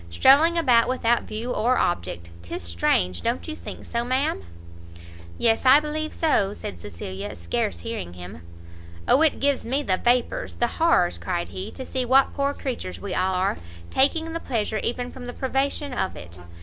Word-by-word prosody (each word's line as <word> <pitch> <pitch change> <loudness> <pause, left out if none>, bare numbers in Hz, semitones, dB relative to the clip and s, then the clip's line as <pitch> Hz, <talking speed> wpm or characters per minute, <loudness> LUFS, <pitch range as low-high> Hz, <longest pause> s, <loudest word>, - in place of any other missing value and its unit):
strolling 285 - +5
about 250 -8 +4
without 240 -2 +1
view 230 +3 -4
or 245 +3 +2
object! 85 -1 -2
'tis 85 0 -6
strange! 85 +1 +1
don't 240 +6 -2
you 315 - -4
think - - -9
so, 235 0 -2
ma'am?" 255 - 0 1.0
"Yes, 225 -1 +2
I 265 +2 +8
believe 310 +1 -3
so," 205 -11 +1
said 85 - -7
Cecilia, 95 +2 -6
scarce 85 0 -2
hearing 85 +1 -5
him. 90 -2 -10 0.7
"O 275 - +5
it 320 -2 +3
gives 280 -1 +1
me 270 +5 -1
the 185 -8 +1
vapours, 245 +2 0
the 240 - +1
horrors," 320 - +3
cried 175 0 -3
he, 190 +3 -6
"to 260 - -7
see 260 0 -1
what 265 +2 +4
poor 280 0 0
creatures 90 - -5
we - - -5
all 185 0 +1
are! 185 +2 0 0.3
taking 320 +4 +2
pleasure 220 -6 -2
even 245 +1 -2
from 245 -1 -9
the 245 - -5
privation 270 +2 -1
of 190 - -2
it! 85 0 -10
240 Hz, 175 wpm, -24 LUFS, -, 1.0 s, I